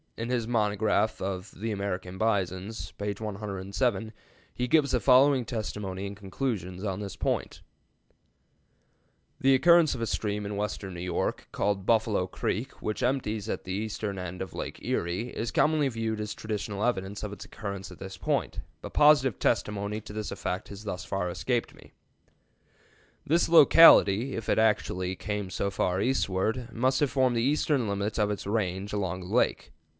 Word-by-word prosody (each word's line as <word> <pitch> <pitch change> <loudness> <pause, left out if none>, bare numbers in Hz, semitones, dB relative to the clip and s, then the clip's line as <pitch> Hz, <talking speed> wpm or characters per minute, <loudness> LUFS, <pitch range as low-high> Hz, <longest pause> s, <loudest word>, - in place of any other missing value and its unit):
In 115 +1 -4
his 120 -3 0
monograph 110 -1 +1
of 95 +1 -4
"The 110 +4 -4
American 95 -2 -4
Bisons," 100 -1 -1
page 100 0 -4
107, 105 +2 -2 0.4
he 125 - -2
gives 145 0 +3
the 125 - +2
following 130 0 +5
testimony 105 -5 -4
and 100 0 -6
conclusions 95 -3 -4
on 95 -2 -2
this 100 -3 -6
point: - - -2 1.8
"The 135 0 +5
occurrence 170 +1 +5
of 120 - -6
a - - +1
stream 105 -1 -2
in 100 0 -4
western 100 -2 -3
New - - -6
York, 90 -1 -2
called 100 -1 -1
Buffalo 110 -5 +2
Creek, 110 +7 -3
which 110 - -2
empties 110 -5 -1
into - - -3
the 95 - -6
eastern 105 -1 -3
end 90 +1 -5
of 95 - -10
Lake - - -5
Erie, 90 +8 -1
is 115 -1 -3
commonly 155 -2 +3
viewed 115 -3 -2
as 105 0 -4
traditional 105 -1 -4
evidence 100 -4 -1
of 105 -1 -4
its - - -9
occurrence 100 -3 -6
at - - -11
this 95 0 -8
point, 90 - -1 0.2
but - - -8
positive 145 -6 +5
testimony 105 +1 0
to 105 - -10
this 105 -1 -4
effect 90 - -4
has 100 +1 -9
thus 95 -4 -4
far 95 -2 -2
escaped 120 +7 -1
me. - - -18 1.3
"This 165 +3 +2
locality, 135 -8 +7
if 115 - -5
it - - +3
actually 95 -4 +1
came 105 -1 -4
so 100 +1 -1
far 90 -1 0
eastward, 115 0 0
must 130 +3 +1
have 145 -4 +1
formed 130 0 +2
the 115 - +1
eastern 140 -2 +1
limit 100 +2 -2
of 105 -1 +2
its 105 - -4
range 100 -2 -1
along 95 -3 -2
the 90 - -8
lakes. 125 - +1
105 Hz, 170 wpm, -28 LUFS, 95-120 Hz, 1.8 s, locality